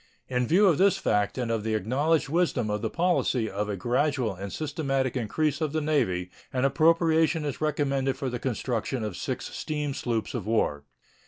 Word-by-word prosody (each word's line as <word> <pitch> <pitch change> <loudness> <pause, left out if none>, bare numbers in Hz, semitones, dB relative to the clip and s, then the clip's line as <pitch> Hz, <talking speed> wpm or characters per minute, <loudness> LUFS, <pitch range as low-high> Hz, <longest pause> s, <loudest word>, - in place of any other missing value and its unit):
In 125 -1 0
view 195 +5 +5
of 170 -6 +4
this 195 0 +4
fact 105 - 0
and 120 -3 -1
of 115 -2 -1
the 110 0 0
acknowledged 145 - +1
wisdom 145 -8 +1
of 105 0 -2
the 110 - -1
policy 165 -7 +1
of 105 +1 -3
a 100 - -2
gradual 125 - 0
and 100 +1 -7
systematic 135 -4 -1
increase 140 +5 -1
of 155 -2 -1
the 155 - +1
Navy 95 -13 0 0.2
an 130 +1 0
appropriation 160 +1 +3
is 145 0 -4
recommended 140 -3 0
for 135 -1 -3
the 125 -1 -3
construction 120 -1 -2
of 105 -4 -4
six - - -4
steam 150 -2 -2
sloops 115 -4 -2
of 110 -6 -4
war. 75 -10 0
130 Hz, 185 wpm, -27 LUFS, 110-155 Hz, 0.2 s, view